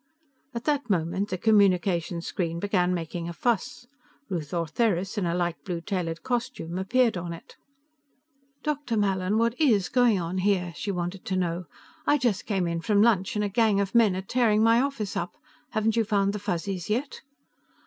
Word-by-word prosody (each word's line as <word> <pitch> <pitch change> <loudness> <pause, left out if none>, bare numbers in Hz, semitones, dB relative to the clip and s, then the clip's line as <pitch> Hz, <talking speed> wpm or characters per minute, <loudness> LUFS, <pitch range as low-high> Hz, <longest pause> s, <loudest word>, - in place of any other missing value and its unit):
_" - - -24
At 235 - -3
that 285 -5 0
moment, 185 +2 0
the 185 - -2
communication 180 -5 +2
screen 170 -3 -2
began 180 -2 +1
making 170 -1 -3
a - - -5
fuss. 240 +4 -1 0.4
Ruth 165 -6 -4
Ortheris, 180 +3 0
in 200 -5 0
a 170 - 0
light 175 -1 -2
blue 175 -3 -3
tailored 165 -2 -3
costume, 245 -8 -3
appeared 230 +2 +2
in 170 -1 -4
it. 165 - -12 1.1
"Dr. 290 -6 -1
Mallin, 195 0 +1
what 230 0 +2
is 215 - +3
going 245 -6 +3
on 175 +2 -3
here?" 185 -3 +1
she 205 - -4
wanted 180 0 -3
to 190 - -1
know. 175 -1 -1 0.4
"I 295 - +5
just 235 -7 0
came 195 -4 0
in 170 -1 -2
from 205 +3 +3
lunch, 205 -5 +2
and 210 0 +1
a - - +1
gang 210 0 +2
of 195 -1 -1
men 225 -5 +5
are 190 - -3
tearing 220 0 +2
my 230 +1 +5
office 270 -7 -2
up. 175 - -3 0.3
Haven't 220 +1 0
you 230 - +3
found 200 -2 +1
the 210 - -3
Fuzzies 185 -1 -3
yet?" 255 +6 -2
195 Hz, 185 wpm, -26 LUFS, 175-225 Hz, 1.1 s, I